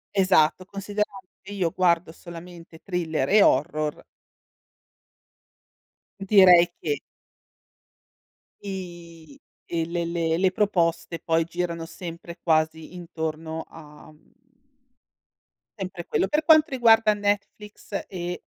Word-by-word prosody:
Esatto, 185 -3 +3
considerando 200 -1 -4
che 205 +2 -10
io 180 -4 -1
guardo 175 -3 +1
solamente 170 0 -12
thriller 165 -7 -2
e 210 +1 +6
horror. 150 -1 +1 2.2
Direi 185 -3 +6
che 145 -2 -2 1.6
I 170 -6 -9 0.3
e 165 -1 -2
le 170 +1 -3
le 165 -1 -1
e 165 - +1
le 185 0 +2
proposte 175 -4 0
poi 165 0 +1
girano 170 -1 -4
sempre 170 0 -9
quasi 160 +1 0
intorno 160 -2 -5
a, 150 -1 -14
mhmm, 155 0 -25 1.4
sempre 185 -4 -6
quello. - - 0
Per 300 +6 0
quanto 315 0 +6
riguarda 225 -4 +4
Netflix 205 0 -4
e 175 -1 -6
175 Hz, 105 wpm, -24 LUFS, 165-195 Hz, 2.2 s, e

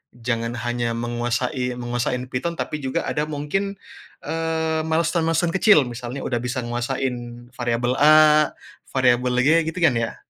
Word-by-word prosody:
Jangan 115 0 -2
hanya 120 -1 -1
menguasai 120 +2 -2
menguasain 120 +1 -2
Python 170 +7 -2
tapi 150 - -3
juga 130 0 -1
ada 150 - -1
mungkin, 155 +7 -2 0.5
eee, 160 -1 -1
milestone-milestone 165 +1 +1
kecil, 195 -6 +6
misalnya 120 +2 -6
udah 120 -2 -1
bisa 125 +1 -3
nguasain 120 0 -4
variabel 120 0 -1
A, 155 0 +6 0.4
variabel 125 -1 +2
G, 145 - +3 0.2
gitu, 180 - -7
kan, 145 -8 +4
ya? 115 - -3
125 Hz, 135 wpm, -22 LUFS, 120-155 Hz, 0.5 s, kecil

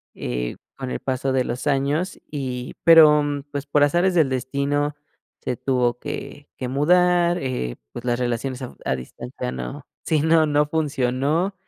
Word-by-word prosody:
eh, - - -3 0.2
con 130 -1 -5
el - - -3
paso 130 0 -1
de 130 -1 +2
los 125 +4 -4
años. 145 +6 0
Y 125 -4 -4
pero, 155 -3 +8 0.3
pues, 145 -1 -4
por 145 0 +3
azares 175 +5 +2
del 160 -6 +4
destino, 140 +3 -1 0.5
se 125 - -2
tuvo 125 -2 0
que 145 0 -7
que 125 - -4
mudar, 175 +5 +3
eh, 125 - -3 0.2
pues, 120 - -8
las 120 -1 +1
relaciones 125 +2 -2
a 125 - -5
fu - - -18
a - - +1
distancia 60 0 -6
no 60 -1 -6 0.2
sí, 155 -2 +2
no, 160 +1 +4
no 150 0 +2
funcionó, 150 +3 0
140 Hz, 165 wpm, -23 LUFS, 125-150 Hz, 0.5 s, pero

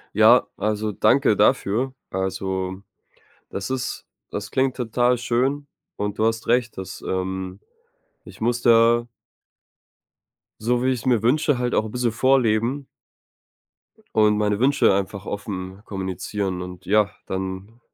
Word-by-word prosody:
Ja, - - +6
also, 105 +1 -1
danke 95 - +3
dafür. 125 +7 +2 0.2
Also, 95 0 -3 0.7
das 100 +5 -5
ist 130 -2 -3 0.3
das 105 0 -5
klingt 130 -1 +1
total 125 0 +1
schön 130 +4 -1 0.3
und 105 0 -3
du 110 - +3
hast 115 0 -1
recht, 120 0 +1
dass 95 -1 -7
ähm, 95 0 -3 0.6
ich - - -14
muss 120 +2 0
da 120 0 +5 1.5
so, 120 +2 +1
wie 130 - +2
ich's 125 -3 -3
mir 120 -4 +2
wünsche, 145 +2 +2
halt 125 0 -1
auch 110 - +2
'n 110 - -7
bisschen 120 -1 0
vorleben 130 +2 +2 1.3
und 105 -1 +4
meine 105 0 +1
Wünsche 140 -4 +4
einfach 100 0 -3
offen 95 -2 -5
kommunizieren 95 -1 -3
und 90 0 -9
ja, 105 +1 +3 0.2
dann 95 +4 -5
110 Hz, 130 wpm, -23 LUFS, 95-125 Hz, 1.5 s, Ja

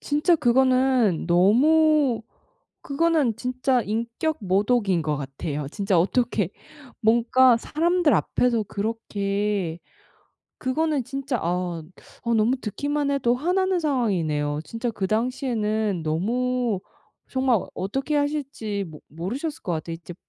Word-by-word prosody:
진짜 300 +4 +2
그거는 255 - +3
너무 260 - +4 0.6
그거는 305 -6 +1
진짜 255 +1 0
인격모독인 215 - 0
것 150 -1 -1
같아요. 140 +1 -5
진짜 195 0 +1
어떻게 215 0 +1 0.5
뭔가 240 +2 +4
사람들 335 +4 +1
앞에서 240 -3 +1
그렇게 200 -4 -2 0.8
그거는 290 +1 0
진짜 270 0 -3
아, 175 -1 -2 0.4
아 235 - 0
너무 225 +3 +3
듣기만 285 +5 -2
해도 245 -4 +2
화나는 365 +6 +1
상황이네요. 170 - 0
진짜 230 +8 -4
그 210 -4 -3
당시에는 220 -3 -1
너무 235 +7 0 0.5
정말 260 -5 +2 0.2
어떻게 270 +10 -2
하실지 275 -8 -2
모 155 -2 -11
모르셨을 245 - -5
것 175 - -2
같아요. 165 +1 -4
이제 170 +1 -9
235 Hz, 255 characters per minute, -24 LUFS, 195-275 Hz, 0.8 s, 너무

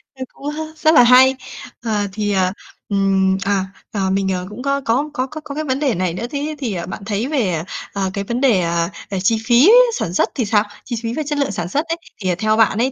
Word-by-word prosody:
ơ, 260 - -5
cũng 285 +1 -6
h 305 - -6 0.2
rất 315 +1 +3
là 245 - +8
hay. 260 +2 +6 0.5
Ờ, 210 -3 0
thì, 210 -1 -1
ờ, 185 -1 +2 0.4
ừm, 195 -1 +2
à, 195 -1 +1 0.3
à, 195 -2 -1
mình, 195 0 0
ờ, 180 0 -3
cũng 210 +4 -8
có 275 +1 0
có 260 +6 0
có 260 -2 -1
có 310 +3 -8
có 280 - -8
cái 310 - -2
vấn 265 -1 -1
đề 270 -8 +1
này 180 -1 -1
nữa, 225 +7 -4
thế 295 +2 -3
thì, 235 -7 -2
ờ, 170 -2 -4
bạn 195 - -7
thấy 215 +4 -1
về, 195 - 0 0.3
ờ, 195 -1 -1
cái 200 -1 -2
vấn 235 +5 -3
đề, 235 -9 +4
ờ, 170 0 0 0.2
về 195 -2 -2
chi 225 +3 +3
phí 250 - +6 0.3
sản 175 - -3
xuất - - +2
thì 240 - 0
sao? 210 0 +3 0.2
Chi 240 - -3
phí 230 +1 -2
về 310 - -2
chất 295 0 -2
lượng 280 -7 0
sản 175 -3 -3
xuất 295 - 0
ấy, 330 +1 -2 0.2
thì, 185 - -1
ờ, 175 - +1
theo 215 +1 +2
bạn 220 -2 +3
ấy 255 +3 +1
220 Hz, 260 wpm, -19 LUFS, 195-270 Hz, 0.5 s, là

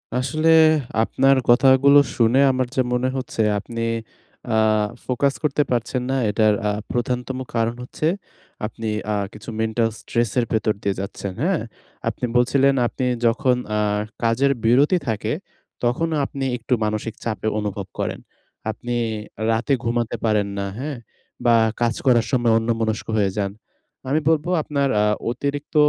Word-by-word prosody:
আসলে 155 +6 +1 0.5
আপনার 135 +4 +3
কথাগুলো 135 +3 +6 0.2
শুনে 120 +2 +4
আমার 130 -1 -1
যা 130 - +3
মনে 125 +1 +1
হচ্ছে, 130 -3 -3 0.2
আপনি 115 +3 -6 0.7
আহ 110 -1 +3 0.2
ফোকাস 135 +2 +1
করতে 150 0 +2
পারছেন 125 +1 0
না। 135 - +1
এটার 105 0 +3
আ - - +2 0.2
প্রধানতম 125 +1 -2 0.2
কারণ 115 0 +1
হচ্ছে, 155 +5 -2 0.6
আপনি 110 +1 -5 0.3
আহ 100 -1 0
কিছু 105 +3 -10
মেন্টাল 110 +1 +1
স্ট্রেসের 120 +1 0
ভেতর 110 -1 +1
দিয়ে 100 -1 0
যাচ্ছেন। 100 -1 -5
হ্যাঁ? 180 -1 +1 0.5
আপনি - - -3
বলছিলেন, 135 +3 +4
আপনি 130 - -3 0.2
যখন 125 +2 +2 0.2
আহ 105 -1 +1 0.2
কাজের 120 +5 +3
বিরতি 135 +10 +4
থাকে, 110 -3 -1 0.5
তখনও 155 +7 +1
আপনি 135 0 -5
একটু 120 +2 -2
মানসিক 110 +1 -2
চাপ 115 -2 -2 0.2
অনুভব 100 -2 -4
করেন। - - -2 0.5
আপনি 120 +2 -5 0.6
রাতে 115 +5 +1
ঘুমাতে 115 0 -1
পারেন 105 -2 +2
না, 100 - -2
হ্যাঁ? 140 0 -4 0.5
বা, 120 -1 +6 0.3
কাজ 120 -1 +2
করার 120 -3 +4
সময় 120 -3 +2
অন্যমনস্ক 115 -1 -1
হয়ে 100 -2 +2
যান। 100 -2 0 0.6
আমি 150 +3 +2
বলবো, 160 +1 +1
আপনার 140 -2 0
আ - - +3 0.3
অতিরিক্ত 145 +5 -4
120 Hz, 140 wpm, -22 LUFS, 110-135 Hz, 0.7 s, কথাগুলো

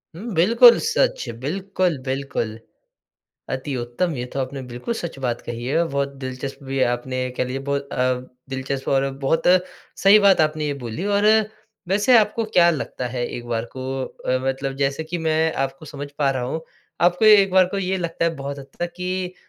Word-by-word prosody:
हुँ, 215 +6 -6
बिल्कुल 230 +7 +7
सच - - +1 0.2
बिल्कुल, 185 +3 -1
बिल्कुल। 130 -5 -3 0.9
अति 135 +2 -3
उत्तम 120 +8 -2
ये 120 - -3
तो 140 - -2
आपने 135 +1 -4
बिल्कुल 120 - -4
सच 170 -9 -6
बात 120 -3 -2
कही 120 0 -5
है 145 +6 +2
बहुत 140 -1 -1
दिलचस्प 130 +2 -6
भी 135 0 -2
आपने 130 +1 -4 0.2
कह - - +1
लीजिए 125 +1 -4
बहुत 140 0 -2
अ, 125 0 +1 0.3
दिलचस्प 135 0 -4
और 135 0 +2 0.2
बहुत 160 +4 +2 0.6
सही 200 +2 +8
बात 200 -4 +5
आपने 155 -1 +1
ये 145 - -1
बोली 120 - -4
और 205 0 +1 0.6
वैसे 205 +6 +4
आपको 220 +1 +1
क्या 170 -1 +6
लगता 140 -5 -4
है 120 0 -2
एक 120 - -7
बार 115 -1 -1
को - - -5 0.2
अ, 130 0 -2
मतलब 135 0 -2
जैसे 140 +3 -1
कि 170 +2 -4
मैं 160 0 +1
आपको 135 +2 -7
समझ 145 0 -7
पा 140 -2 +3
रहा 130 -2 -2
हूँ 135 +6 -3 0.4
आपको 175 +4 +3
एक 205 -3 +7
बार 185 -1 +6
को - - 0
ये 190 0 -1
लगता 170 -1 -2
है 165 0 +1
बहुत 140 +1 -5
हद 135 - -10
तक 175 0 -2
कि 180 0 -3
145 Hz, 190 wpm, -22 LUFS, 130-185 Hz, 0.9 s, सही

